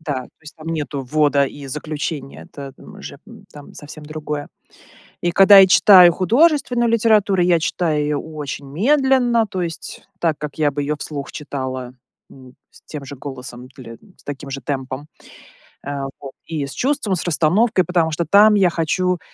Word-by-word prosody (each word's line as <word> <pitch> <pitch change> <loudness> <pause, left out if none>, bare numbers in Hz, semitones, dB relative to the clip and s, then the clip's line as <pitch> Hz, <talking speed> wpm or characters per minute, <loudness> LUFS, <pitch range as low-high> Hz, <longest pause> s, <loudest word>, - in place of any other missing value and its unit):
Да, 145 -5 -4
то - - -17
есть, 150 - -12
там 160 +1 -10
нету 145 -4 -4
ввода 145 +1 +2
и 140 0 -8
заключения- 150 0 -6
это 140 -2 -9
н - - -14
уже, - - -10 0.3
там, 145 -1 -13
совсем 150 +1 -11
другое. 150 -1 -6 0.7
И 175 - 0
когда 195 +2 +7
я 190 - +7
читаю 180 -2 +7
художественную 245 - +2
литературу, 210 -4 +2
я 175 -1 +3
читаю 155 -2 -1
её 150 -1 -1
очень 150 -3 -7
медленно, 245 - +2
то 185 -2 -4
есть 165 -1 -7
так, 165 -4 0
как 150 -2 -7
я 150 - +3
бы 145 +1 -3
её 150 +1 -2
вслух 145 -2 -7
читала, 130 -4 -6 0.4
м, 130 -1 -16 0.2
с - - -19
тем 145 -3 -8
же 140 +1 -9
голосом 125 -2 -9
или 115 -3 -11 0.2
с - - -24
таким 140 -1 -7
же 135 0 -6
темпом, 135 +1 -5 0.8
э, 145 - -4 0.3
вот, 135 -1 -8
и 155 -4 -4
с 140 - -9
чувством, 250 -8 -1
с - - -4
расстановкой, 180 +5 +2
потому 170 -3 0
что 170 +2 -2
там 210 +5 +5
я 190 -3 +4
хочу, 180 +2 -1
155 Hz, 175 wpm, -19 LUFS, 140-185 Hz, 0.8 s, когда